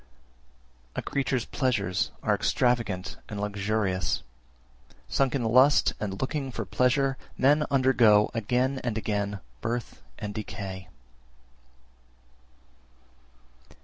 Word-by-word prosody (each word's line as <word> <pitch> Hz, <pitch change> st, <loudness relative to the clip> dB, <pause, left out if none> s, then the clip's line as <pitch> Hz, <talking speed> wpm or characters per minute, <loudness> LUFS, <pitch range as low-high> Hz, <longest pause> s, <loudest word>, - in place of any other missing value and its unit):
341. -, -, -1 dB
A -, -, -2 dB
creature's 130 Hz, -3 st, 0 dB
pleasures 110 Hz, -9 st, 0 dB
are -, -, +2 dB
extravagant 115 Hz, -7 st, 0 dB
and 105 Hz, -, -5 dB
luxurious; 100 Hz, -4 st, -1 dB, 0.8 s
sunk 135 Hz, 0 st, +1 dB
in 130 Hz, -, 0 dB
lust 130 Hz, +6 st, +5 dB
and 95 Hz, -2 st, -4 dB
looking 135 Hz, 0 st, -2 dB
for 115 Hz, -3 st, -4 dB
pleasure, 130 Hz, +6 st, +2 dB, 0.2 s
men 145 Hz, +3 st, +4 dB
undergo 125 Hz, -6 st, +4 dB
(again 125 Hz, +4 st, 0 dB
and 120 Hz, -3 st, -1 dB
again) 105 Hz, -2 st, -2 dB, 0.2 s
birth 120 Hz, 0 st, -4 dB, 0.2 s
and 105 Hz, -1 st, -5 dB
decay. 95 Hz, -4 st, -6 dB
115 Hz, 100 wpm, -27 LUFS, 100-130 Hz, 0.8 s, lust